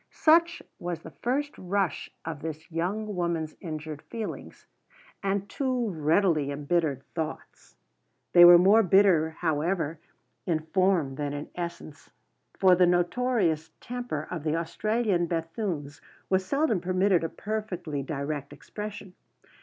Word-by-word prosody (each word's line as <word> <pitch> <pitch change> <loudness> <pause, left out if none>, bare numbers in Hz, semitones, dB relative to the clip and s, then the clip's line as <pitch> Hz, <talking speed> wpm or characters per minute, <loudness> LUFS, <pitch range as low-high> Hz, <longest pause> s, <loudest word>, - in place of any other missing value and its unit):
Such 335 +2 +3 0.2
was 175 -2 -4
the 160 - -9
first 285 +4 -1
rush 185 -4 -1 0.2
of 160 -3 -5
this 160 +1 -7
young 200 +6 -2
lady's 170 -3 -2
injured 155 -3 -6
feelings 225 -2 -7 0.6
and 200 0 -1
too 255 -2 -1
readily 160 -1 +2
embittered 145 -1 -1
thoughts. 160 -2 -6 0.6
They 175 - +9
were 175 0 +11
more 195 +6 +6
bitter, 185 -5 +4
however, 160 0 0 0.5
in 160 -3 +1
form 165 -4 +1
than 145 -1 -2
in 145 +1 -6
essence, 170 -3 -7 0.5
for 190 -1 +6
the 180 0 +5
notorious 175 -2 +1
temper 245 0 -5
of 170 -5 -4
the 155 0 0
Australian 195 +2 0
Bethunes 165 -3 -3 0.3
was 190 0 +3
seldom 275 - +1
permitted 185 0 +2
a 165 - -1
perfectly 185 -9 -4
direct 140 0 -4
expression. 205 -3 -8
175 Hz, 125 wpm, -27 LUFS, 155-200 Hz, 0.6 s, were